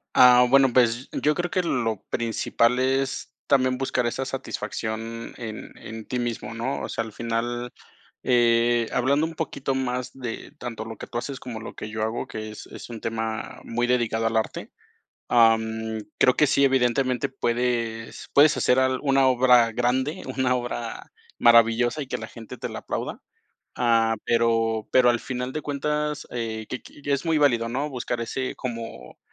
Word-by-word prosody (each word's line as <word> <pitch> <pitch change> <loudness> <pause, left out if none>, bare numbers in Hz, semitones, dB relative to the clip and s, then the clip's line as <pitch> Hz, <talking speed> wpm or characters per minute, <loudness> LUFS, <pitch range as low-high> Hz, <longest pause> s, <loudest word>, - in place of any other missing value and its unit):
Ah, 125 0 +8
bueno, 135 -1 +5
pues, 120 +1 +3
yo 150 - +2
creo 175 +2 -1
que 185 - 0
lo 115 - -1
principal 115 +1 +1
es 135 +1 0
también 130 -2 +3
buscar 130 -2 0
esa 130 +3 -2
satisfacción 115 -3 -5
en 110 -2 -7
en 110 0 -8
ti 125 - -3
mismo, 120 -1 -3
¿no? 120 +4 -3
O - - -5
sea, 115 - -2
al 110 - -10
final, 120 +2 -2 0.5
eh, 120 -1 +3
hablando 140 +5 +2
un 165 0 -6
poquito 140 -4 -2
más 125 -1 -2
de 125 -4 -6
tanto 120 -3 -5
lo 110 -1 -8
que - - -8
tú - - -5
haces 135 +2 -4
como 115 -3 -7
lo 115 - -8
que 105 - -6
yo 110 0 -3
hago, 110 +2 -2
que 110 0 -6
es 105 - -10
es - - -10
un 115 -2 -7
tema 110 0 -4
muy 120 +1 -1
dedicado 115 -2 +1
al 115 - -2
arte, 110 - -1 0.6
am, 110 -1 +3 0.2
creo 125 - +5
que 150 - +4
sí, 140 0 +3
evidentemente, 130 -1 +2
puedes 120 -3 -2
puedes 150 +2 +6
hacer 125 - +3
al 130 0 +2
una 135 -1 +4
obra 125 -2 +5
grande, 130 +7 0
una 130 -1 +2
obra 120 -1 -4 0.3
maravillosa 120 +4 +5
y 140 - -5
que - - -3
la - - -7
gente 115 -2 -10
te - - -4
la - - -6
aplauda. - - -4 0.6
Ah, 115 -2 +3
pero 115 -2 +1
pero 125 -1 +5
al 120 - 0
final 125 0 -4
de 155 - -3
cuentas, 150 +1 -2
eh, 110 -2 -4
que 125 - -4
qui 145 - -16
ya 145 - 0
es 140 +3 -1
muy 165 -1 +2
válido, 120 -6 +3
¿no?, 140 +5 -2
buscar 120 -2 -3
ese 130 +3 -3
como 115 - -7
120 Hz, 180 wpm, -25 LUFS, 115-130 Hz, 0.6 s, Ah